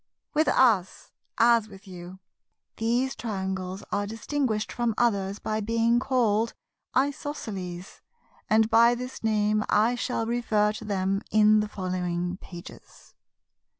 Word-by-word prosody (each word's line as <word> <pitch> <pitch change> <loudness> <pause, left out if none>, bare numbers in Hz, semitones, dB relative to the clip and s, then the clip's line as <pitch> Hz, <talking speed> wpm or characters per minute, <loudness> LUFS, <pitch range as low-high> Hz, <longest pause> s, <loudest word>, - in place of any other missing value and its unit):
With 310 +1 +2
us, 215 -8 +2 0.3
as 230 -2 +4
with 195 0 -14
you, 180 0 -9 0.6
these 240 +4 0
Triangles 190 -3 -4
are 205 0 -1
distinguished 225 0 -2
from 235 -3 -1
others 200 -4 +1
by 215 0 -2
being 230 +2 +2
called 230 -4 +1 0.4
Isosceles; 215 - -3 0.5
and 220 0 +4
by 230 +2 +5
this 250 0 -7
name 215 -1 +2
I 220 +3 +3
shall 245 -2 -2
refer 225 -3 +1
to 215 +1 -8
them 195 -1 -1
in 215 0 +5
the 210 - 0
following 180 -2 -3
pages. 175 -2 -13
215 Hz, 120 wpm, -26 LUFS, 195-235 Hz, 0.6 s, by